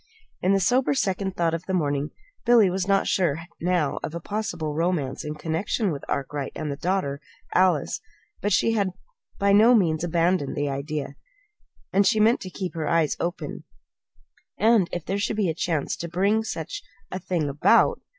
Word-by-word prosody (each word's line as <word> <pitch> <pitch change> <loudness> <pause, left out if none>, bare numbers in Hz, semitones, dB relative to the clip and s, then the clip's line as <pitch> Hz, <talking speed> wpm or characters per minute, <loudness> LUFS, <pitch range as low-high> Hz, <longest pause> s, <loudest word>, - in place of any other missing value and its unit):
In 185 +2 +3
the 195 - +3
sober 250 +8 +2
second 190 -5 -1
thought 165 -1 +1
of 165 0 -4
the 190 - 0
morning, 145 -3 0 0.3
Billy 230 -6 +5
was 190 0 -2
not 195 -1 +3
sure 165 -4 +1 0.2
now 170 -5 +1
of 160 - -5
a - - -3
possible 175 -5 -3
romance 160 -4 -1
in 150 0 -4
connection 170 +6 -1
with 140 - -5
Arkwright 140 0 -3
and 150 - -3
the - - -3
daughter, 150 -3 -1 0.3
Alice; 180 -6 +2 0.4
but 205 - 0
she 230 - +3
had 200 -5 0 0.4
by 200 0 +3
no 225 +4 +7
means 165 -7 +2
abandoned 170 -3 +1
the 145 0 -1
idea, 140 +1 -4 0.8
and 200 +1 +4
she 215 - +3
meant 225 +3 +4
to 185 - -6
keep 185 0 -5
her 160 -3 -2
eyes 165 -3 +2
open 175 +2 -4 0.9
and 220 -5 +4
if 175 -2 -4
there 195 +2 -1
should 215 +1 -1
be 200 -5 +1
a - - 0
chance 160 -2 -1
to 170 - -5
bring 200 +6 +2
such 165 -7 -5 0.3
a 185 - -3
thing 175 -4 -1
about 140 +1 +3
175 Hz, 180 wpm, -25 LUFS, 155-195 Hz, 0.9 s, no